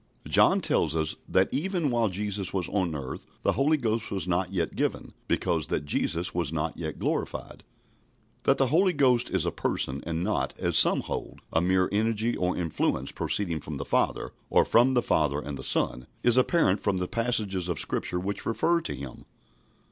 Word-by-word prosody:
John - - +4
tells 80 -1 +2
us 80 -1 0
that 95 +1 +3
even 165 0 0
while 115 -2 +2
Jesus 100 0 -2
was 95 -3 -2
on 90 -6 -1
earth 65 -3 -6 0.2
the - - +3
Holy 150 +3 +2
Ghost 115 -4 -1
was 95 -4 -2
not 90 +1 0
yet 85 -4 -2
given, - - -2
because - - 0
that 75 - -2
Jesus 85 +4 -1
was 85 -4 -1
not 80 0 -2
yet 80 -3 -5
glorified. - - -3 0.8
That - - +4
the 135 -2 +2
Holy 185 +2 +4
Ghost 125 -4 +3
is - - 0
a - - 0
Person, 65 +2 -2
and 85 0 -2
not, 105 +2 -1
as - - -1
some - - +6
hold, - - -6
a 80 - +3
mere 95 +1 +2
energy 110 +2 +1
or 90 0 -1
influence 85 -3 -1
proceeding 85 -6 -1
from 75 0 -6
the 70 - -5
Father, - - 0 0.2
or - - +4
from 125 +3 +4
the 120 - +3
Father 70 -1 +1
and 70 -1 -6
the 65 - -8
Son, 60 -1 0 0.2
is 120 -1 +4
apparent 130 - +3
from 100 -2 0
the 90 0 -2
passages 105 -6 -1
of 85 -5 -2
Scripture 90 - -1
which 100 +3 -4
refer 170 +9 +1
to 70 - -4
Him. 65 -1 -9
95 Hz, 190 wpm, -27 LUFS, 80-115 Hz, 0.8 s, some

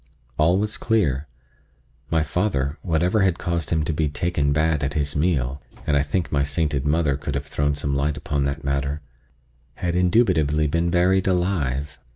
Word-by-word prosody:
All 85 +4 +4
was 105 +2 -1
clear. 75 - 0 0.8
My 80 -2 +2
father, 80 -6 -1
whatever 90 +4 +1
had 95 -3 +2
caused 85 -2 -2
him 80 -2 +1
to 80 - -1
be 75 0 0
"taken 75 -1 0
bad" 75 0 +1
at 70 +1 -2
his 75 -1 0
meal 75 -4 0 0.2
(and 75 - +1
I 70 - +4
think 80 +4 -2
my 70 - +2
sainted 75 -2 -1
mother 75 -2 +2
could 70 0 -4
have 70 0 -3
thrown 75 0 0
some 70 -1 -2
light 70 +1 0
upon 70 -1 -1
that 70 +3 -3
matter) 70 +2 -1 0.7
had 85 -1 -2
indubitably 90 -6 +3
been 85 +3 +1
buried 90 +2 +2
alive. 75 -7 -1
75 Hz, 175 wpm, -23 LUFS, 70-85 Hz, 0.8 s, All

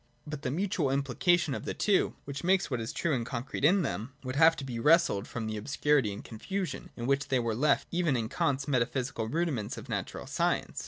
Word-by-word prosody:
But 150 -2 -6
the 125 - -2
mutual 175 0 0
impli 135 -1 -2
cation 175 -5 +3
of - - -4
the - - -3
two, 205 -2 +2
which 140 0 -6
makes 185 -3 +2
what 125 -3 -1
is 110 - -4
true 170 - 0
and 120 -3 0
con 120 0 -4
crete 135 - -6
in 180 +5 +5
them, 130 -2 -4
would 130 0 -4
have 160 +2 +6
to - - -6
be 125 -3 -4
wrested 125 - +4
from 115 -2 -4
the 110 0 -3
obscurity 135 +1 +1
and 100 - -7
confusion 180 - -4
in 120 - -4
which 140 +1 +1
they 130 - +2
were 115 -2 0
left 140 +5 +2
even 170 -6 +1
in 115 -2 -1
Kant's 140 +4 0
Metaphysical 125 -3 0
Rudiments 140 -6 -1
of - - -9
Natural - - -4
Science. - - -1
140 Hz, 225 wpm, -30 LUFS, 120-160 Hz, -, have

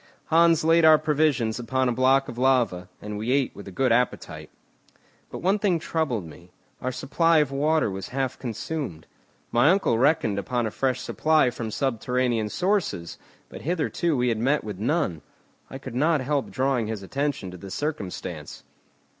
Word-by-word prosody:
Hans 165 -1 +5
laid 165 +1 +4
our 160 -1 +8
provisions 150 -7 +1
upon 130 +2 0
a - - +2
block 130 +2 +3
of 120 - -7
lava, 120 -9 +1
and 105 0 -5
we 115 +4 -2
ate 135 -1 +1
with 100 - -10
a - - -7
good 130 +5 +1
appetite. 125 +2 -1 0.8
But - - -8
one 195 +3 +2
thing 195 -4 +2
troubled 150 - -2
me, 85 +3 -13 0.3
our 130 - -2
supply 165 +6 +2
of 150 -3 +2
water 155 +3 +2
was 95 0 -5
half 135 0 -2
consumed. 120 - -5 0.5
My 120 +6 +4
uncle 180 - +2
reckoned 125 -7 +2
upon 120 +5 -1
a 110 - -2
fresh 130 +3 -1
supply 155 -5 +2
from 115 -2 -5
subterranean 125 -2 -1
sources, 180 - -1 0.3
but - - -10
hitherto 165 -1 -1
we 125 0 +1
had 115 -2 -1
met 135 +6 +1
with 105 -3 -6
none. 115 - 0 0.5
I - - -7
could 130 -2 -9
not 155 +5 +2
help 140 +1 -1
drawing 130 -4 0
his 110 -3 -5
attention 135 -4 -2
to 90 - -9
this 95 +2 -8
circumstance. 145 - -5
130 Hz, 170 wpm, -25 LUFS, 110-155 Hz, 0.8 s, our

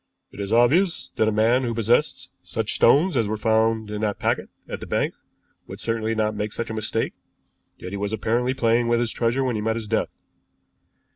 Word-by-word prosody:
"It - - -13
is 100 0 -4
obvious 155 +11 +3
that 110 - +3
a - - +2
man 115 +4 +3
who 120 -3 -2
possessed 115 - +1
such 105 +5 -2
stones 150 +8 +4
as 115 -4 +2
were 110 +1 -2
found 110 0 +1
in 105 0 -4
that 105 -2 -1
packet - - -1 0.2
at - - -5
the - - -8
bank - - 0 0.5
would - - -9
certainly 115 -1 -1
not 110 0 0
make 105 0 -3
such 115 -1 -4
a - - -4
mistake; 110 +1 -2 0.6
yet 90 - -8
he 100 - -4
was 100 +1 -2
apparently 120 +4 0
playing 115 -1 +2
with 120 0 +2
his 120 -1 0
treasure 120 +3 0
when 125 -3 0
he 105 - -2
met 110 +1 0
his 115 -1 -4
death. 110 +1 0
115 Hz, 210 wpm, -23 LUFS, 110-120 Hz, 0.6 s, stones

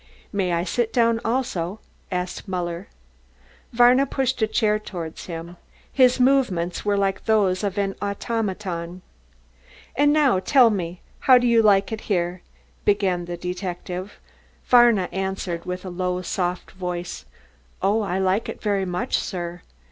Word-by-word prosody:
"May 190 -3 0
I 170 0 +1
sit 225 +4 -1
down 230 -2 +2
also?" 220 -6 -2 0.3
asked 180 +2 -3
Muller. 175 0 -3 0.8
Varna 245 +3 +5
pushed 265 -1 -1
forward 215 -1 +1
a 170 -6 -6
chair. 170 0 -7 0.4
His 255 -1 +4
movements 245 -10 +2
were 205 -1 +1
like 195 -1 -1
those 205 -4 +2
of 200 -1 -2
an 195 -1 0
automaton. 190 -4 -3 0.9
"And 290 +2 +4
now 290 -9 +3
tell 245 +3 +5
me 175 -3 -4 0.2
how 260 - +6
you 240 -2 +4
like 200 -2 +4
it 220 0 -4
here?" 175 -2 0 0.4
began 190 -4 +1
the 175 0 -5
detective. 180 +1 -5 0.5
Varna 240 -7 +5
answered 190 -3 -3
with 180 +1 -5
a - - -4
low 180 0 -2
soft 180 0 -2
voice, 175 - -5 0.5
"Oh, 205 +4 +2
I 190 -3 -2
like 190 +3 +1
it - - -6
very 200 -3 0
much, 180 -1 -1
sir." 175 -1 -5
195 Hz, 140 wpm, -23 LUFS, 180-225 Hz, 0.9 s, how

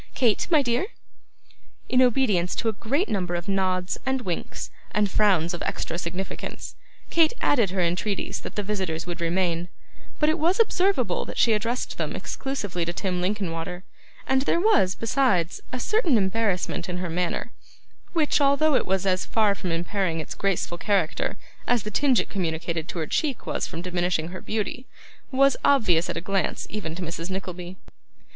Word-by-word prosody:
Kate, 235 -5 +2
my 310 -4 +5
dear!' 245 +9 +1 1.0
In 255 - +4
obedience 220 -8 +3
to 230 - -1
a 220 - +2
great 265 - 0
number 180 -5 -1
of 175 +2 -4
nods, 185 -2 0
and 265 0 0
winks, 180 -7 -4 0.2
and 205 -2 +1
frowns 185 -5 +3
of 175 - -5
extra - - -3
significance, 180 +3 -5 0.4
Kate 330 +2 +4
added 235 -9 +3
her 185 0 -1
entreaties 180 +4 -1
that - - -8
the 210 - -1
visitors 190 -6 -2
would 175 0 -5
remain; 170 0 0 0.5
but 300 - +3
it 315 +2 +2
was 345 +6 +2
observable 395 -3 +2
that - - -7
she 230 - +5
addressed 230 +4 -2
them - - -2
exclusively 205 -10 -3
to 170 - -2
Tim 180 0 -2
Linkinwater; 180 -2 -2 0.4
and 265 0 +3
there 310 - +2
was, 350 - +4
besides, 225 - +1
a 255 - -3
certain 350 - +2
embarrassment 190 -3 0
in 180 - -2
her 180 0 -2
manner, 175 +1 -2 0.6
which, 310 -3 +2
although 285 +2 +4
it - - +2
was 190 0 +1
as 185 -1 +2
far 215 -3 +3
from 185 -3 -4
impairing 170 0 -1
its 155 - -5
graceful 180 -3 -1
character 200 0 0 0.3
as 245 -3 +2
the 210 - -5
tinge 265 0 +3
it - - -1
communicated 165 -3 -2
to - - -6
her 160 - -1
cheek 280 - -1
was - - -2
from 170 - -6
diminishing 175 -2 0
her 185 +1 -7
beauty, 225 +4 -3 0.4
was 275 +1 +5
obvious 195 -12 +4
at - - -2
a - - -2
glance 195 +1 -1
even 165 -6 -4
to 185 - -5
Mrs. 170 +1 -4
Nickleby. 185 -1 -5
195 Hz, 175 wpm, -25 LUFS, 175-250 Hz, 1.0 s, my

